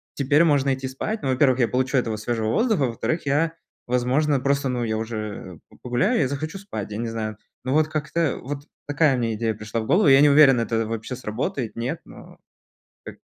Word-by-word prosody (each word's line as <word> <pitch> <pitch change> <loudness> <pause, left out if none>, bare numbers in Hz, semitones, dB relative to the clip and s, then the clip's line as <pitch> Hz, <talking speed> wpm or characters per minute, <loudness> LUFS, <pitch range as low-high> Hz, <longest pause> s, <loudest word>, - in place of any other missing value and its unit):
теперь 145 +3 +3
можно 140 -4 +3
идти 130 0 -4
спать. 210 +12 -4
Ну, 135 - -2
во-первых, 130 0 +3
я 120 - +3
получу 130 +3 -1
этого 115 -3 0
свежего 110 0 -2
воздуха, 220 - +1
во-вторых, 145 +8 -3
я, 160 +4 +1 0.3
возможно 130 +4 +1
просто 140 +1 0
ну, 125 -1 -1
я 110 -1 -1
уже 110 0 -4 0.4
э - - -19
п - - -20
погуляю, 125 - +1
я 135 - +2
захочу 155 +7 -4
спать, 150 - -6
я 105 - -4
не 115 +1 -3
знаю. 110 -2 -4 0.3
Ну 130 +1 -1
вот 155 +1 +3
как-то 155 +1 -1
вот 140 +1 -6 0.2
такая 145 -1 +3
мне 115 -2 -1
идея 110 0 -1
пришла 105 +2 -4
в - - -6
голову. 185 -1 +4
Я 135 0 +7
не 145 - +6
уверен, 140 -3 +6
это 115 -1 0
вообще 115 +3 -4
сработает, 120 +1 -4
нет, 115 +2 -3
но - - -14 0.7
Так - - -9
130 Hz, 205 wpm, -23 LUFS, 115-145 Hz, 0.7 s, Я